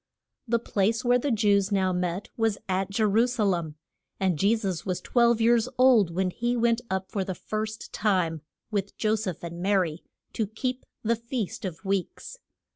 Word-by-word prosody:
The 235 +1 +3
place 225 +1 0
where 245 +1 +4
the 285 - -1
Jews 205 -3 +2
now 190 -2 +2
met 180 +2 -2
was 225 -3 +1
at 190 0 0
Je 215 +3 0
ru 215 +3 +4
sa 245 -3 -1
lem, 170 -6 0 0.4
and 185 -6 +1
Je 205 +4 +4
sus 195 -7 -3
was 185 -2 -2
twelve 235 -2 +3
years 235 +1 +3
old 250 -7 +5
when 185 +2 -1
he 240 +5 -1
went 235 0 +2
up 190 0 -3
for 195 - -1
the 185 -1 -4
first 215 +3 -5
time, 180 -7 +1 0.3
with 200 -1 -2
Jo 215 -1 +1
seph 205 -7 -3
and 170 0 -6
Ma 200 +3 +1
ry, 170 -4 0 0.3
to 220 - -1
keep 250 +4 -4 0.2
the 230 +1 +2
Feast 230 -3 -4
of 175 -4 -5
the - - -9
Weeks. 195 - -3
205 Hz, 195 wpm, -27 LUFS, 185-230 Hz, 0.4 s, old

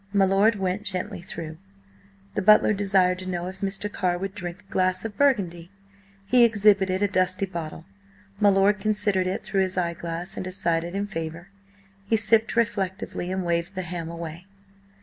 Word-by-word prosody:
My 200 -1 +4
lord 200 +3 +3
went 190 0 -2
gently 185 -4 -3
through. 160 -3 -7 0.7
The - - -1
butler 215 +1 +6
desired 190 -2 +2
to 185 0 -5
know 175 -1 -3
if 185 +1 -8
Mr. 195 +1 -2
Carr 180 -2 0
would 195 +1 -4
drink 175 0 -6
a - - -26
glass 185 +1 +1
of 215 -2 -5
burgundy? 185 -12 +1 0.6
He 245 +4 +5
exhibited 205 -4 +3
a - - +4
dusty 185 0 +1
bottle. 165 -3 -7 0.5
My 205 -1 +5
lord 200 +1 +3
considered 205 -2 +1
it 185 - -3
through 195 - 0
his 185 0 -1
eyeglass 170 0 -3
and - - -3
decided 175 -1 -1
in 200 +1 -1
favour. 165 -2 -6 0.5
He 220 +3 +1
sipped 220 +2 +3
reflectively 190 -5 -1
and 185 -1 -2
waved 170 +2 -1
the 185 - -3
ham 170 -1 -5
away. 170 +1 -7
185 Hz, 170 wpm, -25 LUFS, 175-205 Hz, 0.7 s, butler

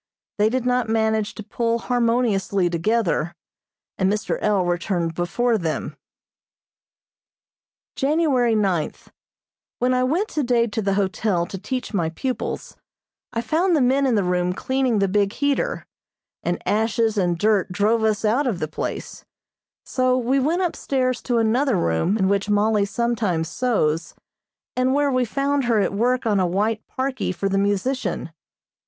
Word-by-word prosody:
They 210 +1 +4
did 255 +1 -1
not 250 -2 +1
manage 220 -1 0
to 215 - -7
pull 230 +2 -1
harmoniously 230 -7 +1
together, 175 -2 0 0.6
and 190 0 +2
Mr. 210 0 -2
L. 205 -4 +2
returned 175 -1 -1
before 220 +7 0
them. 160 -3 -3 2.0
January 275 -5 +2
ninth: 190 -7 -1 0.7
When 250 +1 +1
I 255 0 +2
went 335 +11 +1
today 245 - +1
to 220 -1 -3
the 195 -1 0
hotel 190 -2 0
to 195 - -8
teach 255 +5 -4
my 170 -5 0
pupils, 255 +10 -4 0.6
I 230 - -2
found 330 +9 +1
the - - +3
men 270 +2 +3
in 245 - +2
the 205 - +2
room 180 0 0
cleaning 260 +2 0
the 200 -1 +2
big 200 +1 +1
heater, 285 0 -1 0.6
and - - -1
ashes 220 +1 +1
and 175 -4 +1
dirt 205 0 +2
drove 215 +5 +1
us 220 0 +1
out 250 +7 +2
of 220 -7 0
the 155 - -2
place, 155 - -5 0.6
so 255 -1 +1
we 255 +2 +1
went 330 +7 +1
upstairs 260 -7 -1
to 245 -2 0
another 235 +3 +2
room 170 - +1
in 190 -3 +2
which 200 +1 0
Mollie 210 0 +2
sometimes 205 -7 -1
sews, 170 -9 0 0.6
and 255 +1 +2
where 290 -1 +2
we 255 -1 +2
found 275 +3 0
her 230 -3 +2
at 200 - 0
work 245 +5 +1
on 210 -3 +2
a 185 - +2
white 210 +5 0
parkie 260 -5 -2
for 185 +2 -2
the 195 0 +1
musician. 200 -2 -1
220 Hz, 155 wpm, -22 LUFS, 195-255 Hz, 2.0 s, They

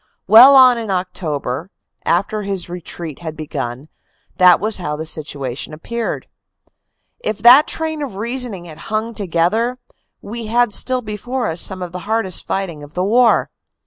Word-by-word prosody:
Well 240 +7 +8
on 255 -2 +7
in 225 -2 -6
October, 170 -5 -3 0.4
after 200 +5 0
his 195 -3 -3
retreat 170 -3 -7
had 160 -2 -7
begun, 140 -3 -5 0.5
that 180 -2 +6
was 215 +2 -1
how 150 -5 -4
the 155 +1 -5
situation 145 -4 -3
appeared. 235 +9 -5 0.9
If 215 - -3
that 255 +6 +8
train 315 -1 -2
of 270 -9 -5
reasoning 230 -3 -3
had 160 -2 -12
hung 220 +2 -2
together, 210 +6 0 0.4
we 230 +1 -7
had 235 -1 +1
still 255 +3 +2
before 235 +4 -4
us 165 +1 -1
some 185 -1 0
of 175 - -7
the 180 - -6
hardest 220 -5 0
fight 195 -2 -2
ing 150 -2 -12
of 145 +1 -13
the 180 - 0
war. 235 +4 +3
195 Hz, 160 wpm, -18 LUFS, 165-235 Hz, 0.9 s, Well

